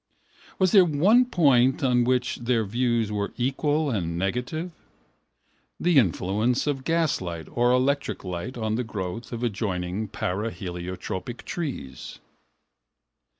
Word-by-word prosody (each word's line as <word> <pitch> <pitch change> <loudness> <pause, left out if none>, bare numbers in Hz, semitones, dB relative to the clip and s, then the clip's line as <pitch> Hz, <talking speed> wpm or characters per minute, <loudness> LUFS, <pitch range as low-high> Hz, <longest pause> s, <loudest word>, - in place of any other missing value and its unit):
Was 185 -2 +3
there 195 -3 +8
one 185 - +4
point 135 - +3
on 125 -2 +3
which 125 0 +1
their 120 -2 0
views 115 0 0
were 100 -1 -2
equal 145 +4 0
and 85 -6 -2
negative? 125 - -2 1.1
The 175 -5 +4
influence 105 +4 +1
of 140 -3 -1
gaslight 130 - -1
or 120 +1 +2
electric 135 +3 +1
light 95 +7 -5
on 110 -2 -1
the 125 +3 0
growth 105 0 -5
of 120 0 -4
adjoining 100 -2 -2
paraheliotropic 95 +2 -4
trees. 145 - -5
120 Hz, 115 wpm, -25 LUFS, 95-140 Hz, 1.1 s, there